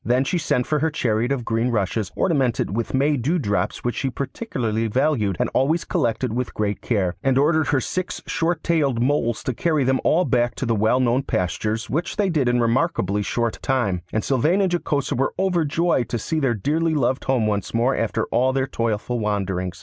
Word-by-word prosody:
Then 125 +3 +2
she 175 +6 -1
sent 125 -5 0
for 150 - 0
her 160 +2 +1
chariot 120 -4 0
of 130 -4 -1
green 115 +2 0
rushes, 105 -2 -1
ornamented 130 - 0
with 115 +3 -2
May 145 +2 +2
dewdrops, 130 - -1
which 120 - 0
she 135 - -2
particularly 125 - -3
valued 110 - +1
and - - +2
always 160 +6 +1
collected 125 -6 -1
with 125 +1 -3
great 105 -1 -1
care; 95 -7 0
and 135 -1 +2
ordered 155 +1 +3
her 135 +1 +2
six 185 +7 -3
short 165 0 -1
tailed 145 -8 +1
moles 120 -2 0
to 130 - -1
carry 155 +2 +1
them 130 +1 +1
all 180 +3 +3
back 120 -4 +1
to - - -3
the 115 - +1
well 110 +4 +2
known 125 +1 +2
pastures, 110 0 -2
which 160 +5 -2
they 200 -3 +1
did 140 -7 +1
in 120 - +2
a - - +2
remarkably 105 -4 +1
short 115 +3 -1
time; 110 -9 0
and 110 - -1
Sylvain 150 +8 +2
and 190 -3 +2
Jocosa 145 -4 -1
were 135 0 -1
overjoyed 170 -7 +1
to 120 - -1
see 160 +8 -2
their 130 -5 +1
dearly 155 - 0
loved 130 -2 0
home 130 -4 +1
once 105 -1 -1
more 120 +4 +1
after 115 0 -1
all 130 +2 +2
their 135 0 +1
toilful 115 -1 -2
wanderings. 95 -4 -2
125 Hz, 205 wpm, -22 LUFS, 115-150 Hz, -, ordered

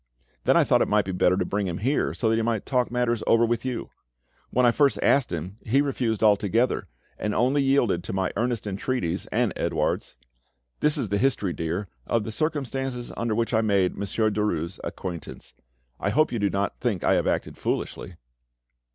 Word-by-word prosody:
Then - - +5
I - - +6
thought - - +3
it - - +2
might 105 -1 +2
be 95 - -3
better 90 0 +2
to - - 0
bring 100 -1 -1
him 85 -1 -3
here, 135 +9 0
so 115 - 0
that 110 - +3
he 115 - +1
might 115 -2 -1
talk 125 -2 +1
matters 120 -2 0
over 115 +1 +5
with 120 0 -1
you. 130 -2 -4 0.6
When 125 0 +2
I 120 - +6
first 140 +3 +3
asked 135 -2 +3
him, 90 +4 -5
he 125 +5 +2
refused 125 -6 0
altogether, 105 +3 +2 0.3
and 105 -1 -1
only 130 +5 +3
yielded 135 -10 +2
to - - -4
my 95 -1 -1
earnest 115 -1 -1
entreaties 100 -2 -2
and - - 0
Edouard's. - - -1 0.6
This 150 0 +2
is 110 - -2
the 100 +1 +1
history, 110 -8 +1
dear, 85 +5 -3 0.2
of 115 - +1
the 110 - -5
circumstances 135 -3 -2
under 115 -2 -1
which 115 +2 -1
I 110 - +4
made 100 -4 +2
Monsieur 110 +2 0
Derues' 95 -4 -1
acquaintance. 85 -4 -7 0.5
I - - 0
hope 155 +1 +3
you 120 - -2
do 100 -1 +2
not 100 0 -2
think 105 -8 -1
I - - +4
have - - +1
acted - - -1
foolishly?" 90 - -3
110 Hz, 195 wpm, -25 LUFS, 100-125 Hz, 0.6 s, I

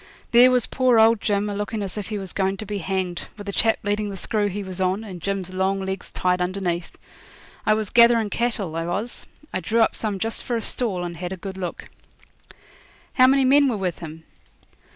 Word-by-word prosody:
There 245 +2 +8
was 250 -2 +2
poor 255 -2 +2
old 225 0 +5
Jim 205 -1 0
a 205 - -3
lookin' 205 +1 -3
as 195 - -5
if 210 -2 -4
he 215 - -3
was 195 -2 -5
goin' 190 0 0
to 215 - -6
be 205 0 -4
hanged, 185 -1 -3
with 205 -1 -9
a - - -2
chap 225 +3 +2
leading 205 0 -1
the 195 - -6
screw 210 +2 0
he 200 +1 -4
was 190 -1 -6
on, 190 +3 0
and 185 -5 -8
Jim's 190 0 -3
long 190 +1 0
legs 190 -1 -5
tied 180 0 0
underneath. 180 -2 -2 0.7
I 215 - +5
was 215 -2 -3
gatherin' 235 -3 +5
cattle, 215 -8 -1
I 165 0 -2
was. 205 +7 -4 0.3
I - - 0
drew 225 +4 +3
some 215 -2 -3
up 190 - -8
just 225 0 -1
for 240 - -2
a 230 - -1
stall, 200 -8 -1
and 170 -1 -5
had 180 +1 -5
a - - -6
good 190 +1 -7
look.' 180 -3 -5 1.3
'How 255 -1 +6
many 270 0 +4
men 280 +2 +5
were 240 -5 0
with 185 -3 -2
him?' 160 -1 -9
200 Hz, 220 wpm, -23 LUFS, 185-225 Hz, 1.3 s, There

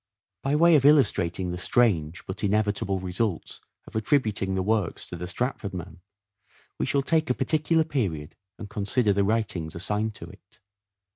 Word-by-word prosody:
By 135 +2 0
way 170 +2 +6
of 140 - +4
illustrating 95 - +3
the 90 - -5
strange 90 -8 +1
but 95 +3 -7
inevitable 105 -1 +1
results 95 0 -3 0.2
of - - -15
attributing 110 -5 +1
the 95 - 0
works 105 -2 -1
to - - -8
the 90 +1 -6
Stratford 105 -2 -3
man, 90 0 -8 0.8
we - - 0
shall 140 -1 +1
take 160 0 +1
a 125 - +2
particular 155 +4 +2
period 100 - -3 0.2
and 105 - -8
consider 105 +1 +1
the 100 0 +2
writings 100 -7 -1
assigned 105 +5 -2
to - - -9
it. - - -18
105 Hz, 160 wpm, -26 LUFS, 95-125 Hz, 0.8 s, way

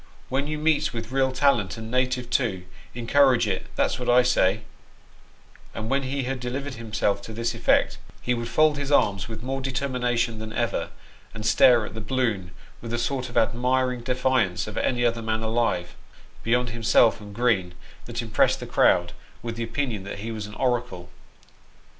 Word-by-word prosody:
When 135 +2 -1
you 155 0 -2
meets 155 -2 +1
with 115 0 -6
real 135 0 +2
talent, 130 - +1
and 110 0 -7
native, 125 -1 0
too, 110 -7 0 0.3
encourage 125 -1 +3
it, 95 - -2
that's - - 0
what 125 - -3
I 125 +1 +6
say; 110 -4 +2 0.6
" - - -27
and 110 +2 -4
when 140 +1 +2
he 135 +1 -2
had 130 +1 -3
delivered 130 +3 -4
himself 105 -4 -1
to 110 - -9
this 115 +2 -2
effect, - - +2 0.2
he 125 - -1
would 120 -1 -3
fold 155 -2 +3
his 140 0 -3
arms 100 -7 +2
with 110 0 -7
more 135 +1 -3
determination 125 -3 -1
than 110 0 -7
ever, 120 -3 -1 0.5
and 110 -1 -6
stare 120 0 +5
at 100 - -8
the 110 - -6
balloon 110 -5 -1 0.3
with 115 0 -6
a - - 0
sort 125 +2 -2
of 120 - -5
admiring 125 +2 +1
defiance 125 -6 +1
of 110 - -8
any 120 -1 0
other 115 -1 +1
man 110 0 -2
alive, 110 -6 -1 0.5
beyond 120 +1 +1
himself 115 0 +3
and 105 -1 -10
Green, 100 -7 +1 0.3
that - - -4
impressed - - +2
the - - -6
crowd 85 -1 +3 0.3
with 115 -1 -4
the 115 - -3
opinion 115 -4 -3
that 100 0 -6
ho 115 +1 -4
was 105 -2 -5
an 105 - -10
oracle. 120 -9 -2
120 Hz, 185 wpm, -25 LUFS, 110-130 Hz, 0.6 s, I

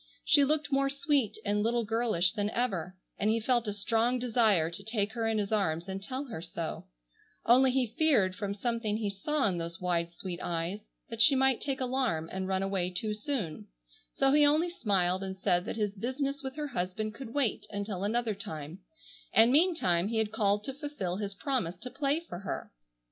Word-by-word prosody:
She 290 -2 +6
looked 295 +1 +1
more 275 0 +2
sweet 280 -4 0
and 205 0 +1
little 230 +1 +1
girlish 215 -5 +2
than 205 -2 -1
ever, 190 -7 -2 0.2
and 210 - +2
he 225 +1 +2
felt 240 0 +1
a - - 0
strong 225 +4 +1
desire 220 -9 +2
to 185 +4 -6
take 210 -1 -1
her 230 -2 -1
in 225 -1 +1
his 205 -1 -1
arms 175 -5 0
and 190 0 -4
tell 260 +7 -4
her 220 -11 -7
so, 165 - -5 0.6
only 260 +3 +6
he 255 0 +2
feared, 230 - +4
from 200 0 -3
something 230 -1 -1
he 210 -2 -2
saw 270 +9 -1
in 180 -3 -1
those 170 0 -5
wide, 170 -2 0
sweet 175 0 -6
eyes, 170 +4 -2 0.3
that 230 0 -1
she 280 0 +8
might 265 -2 +3
take 275 -2 -2
alarm 250 -11 0
and 190 0 -3
run 190 0 0
away 195 -2 0
too 210 +4 -2
soon, 210 - -3 0.5
so 270 0 +3
he 295 +1 +5
only 310 +4 +3
smiled 190 - +1
and 190 -1 -5
said 175 -1 +1
that - - -4
his 210 -2 0
business 265 +6 -3
with 265 -1 -6
her 300 -1 -4
husband 215 0 -3
could 235 +1 -9
wait 270 -7 0
until 200 -2 -4
another 225 +1 0
time, 160 -4 -7 0.5
and 225 +2 +6
meantime 275 - +3
he 225 +1 -2
had 220 -1 +1
called 210 -2 +1
to 270 - -4
fulfil 280 - -4
his 200 -1 -4
promise 210 - -2
to 250 +7 -8
play 290 0 0
for 255 - -8
her. 195 - -5
215 Hz, 200 wpm, -30 LUFS, 190-260 Hz, 0.6 s, she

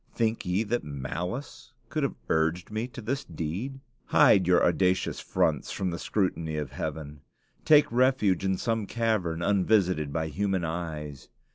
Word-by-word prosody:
Think 115 -3 0
ye 90 +4 +1
that 120 +3 -1
malice 85 - -5 0.2
could 155 - -2
have 140 - -1
urged 80 +4 0
me 110 +3 -2
to 120 - -10
this 135 +6 -2
deed? 90 - -5 0.3
Hide 95 -3 +5
your 90 -1 +4
audacious 90 +1 +1
fronts - - 0
from 95 -2 -2
the 85 - -4
scrutiny 85 -6 -1
of 75 -2 -4
heaven. 75 -2 -5 0.4
Take 150 -4 +6
refuge 120 -7 +2
in 95 -1 +1
some 115 -2 -1
cavern 105 -8 -1
unvisited 95 -6 +2
by 80 +1 -2
human 95 +2 -1
eyes. 75 -5 -5
90 Hz, 150 wpm, -28 LUFS, 80-110 Hz, 0.4 s, Take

